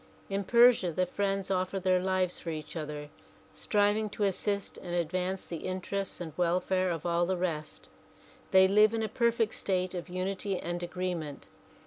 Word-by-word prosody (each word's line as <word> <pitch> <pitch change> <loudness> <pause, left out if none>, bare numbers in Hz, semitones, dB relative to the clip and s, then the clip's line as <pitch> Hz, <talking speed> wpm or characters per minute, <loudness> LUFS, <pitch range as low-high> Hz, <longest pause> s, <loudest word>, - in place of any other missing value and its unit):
In 200 0 0
Persia 235 -6 +5
the 185 +3 +1
friends 195 +1 -1
offer 185 +1 0
their 185 -1 +2
lives 185 -1 0
for 170 - -6
each 155 0 -6
other, 150 -2 -5 0.4
striving 210 +1 +1
to 205 - -3
assist 200 0 -1
and 175 -1 -5
advance 180 +3 -1
the 170 -3 -6
inter 185 +1 -3
ests 195 -1 -3
and 165 -3 -6
welfare 185 +2 +1
of 165 -2 -3
all 170 0 +2
the 190 0 0
rest. 165 -4 -4 0.6
They 190 0 +7
live 210 +3 +5
in 225 - -1
a - - 0
perfect 230 0 +1
state 185 -1 -1
of 180 0 -5
unity 190 +2 -2
and 175 0 -4
agreement. 175 -4 -4
185 Hz, 170 wpm, -30 LUFS, 175-200 Hz, 0.6 s, They